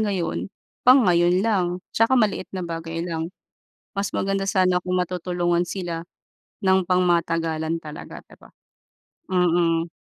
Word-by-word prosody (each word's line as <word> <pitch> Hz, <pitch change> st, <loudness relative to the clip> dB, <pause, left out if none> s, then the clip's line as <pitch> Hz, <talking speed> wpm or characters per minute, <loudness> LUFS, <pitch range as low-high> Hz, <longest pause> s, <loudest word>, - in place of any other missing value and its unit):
ngayon, 170 Hz, -, -1 dB, 0.3 s
pang 255 Hz, -1 st, +6 dB
ngayon 175 Hz, +1 st, +3 dB
lang, 200 Hz, -6 st, +2 dB, 0.3 s
tsaka 230 Hz, +4 st, +3 dB
maliit 215 Hz, -5 st, +1 dB
na 185 Hz, -, -3 dB
bagay 165 Hz, 0 st, -4 dB
lang, 165 Hz, -1 st, -3 dB, 0.6 s
mas 200 Hz, 0 st, -2 dB
maganda 195 Hz, 0 st, -1 dB
sana 185 Hz, -2 st, +3 dB
kung 180 Hz, 0 st, -3 dB
matutulungan 175 Hz, -1 st, 0 dB
sila 175 Hz, -3 st, -5 dB, 0.6 s
ng 190 Hz, -1 st, +3 dB
pangmatagalan 165 Hz, -3 st, +1 dB
talaga, 155 Hz, -2 st, -9 dB
di -, -, -19 dB
ba? -, -, -16 dB, 0.8 s
Mm. 170 Hz, -2 st, +2 dB
175 Hz, 125 wpm, -23 LUFS, 165-190 Hz, 0.8 s, pang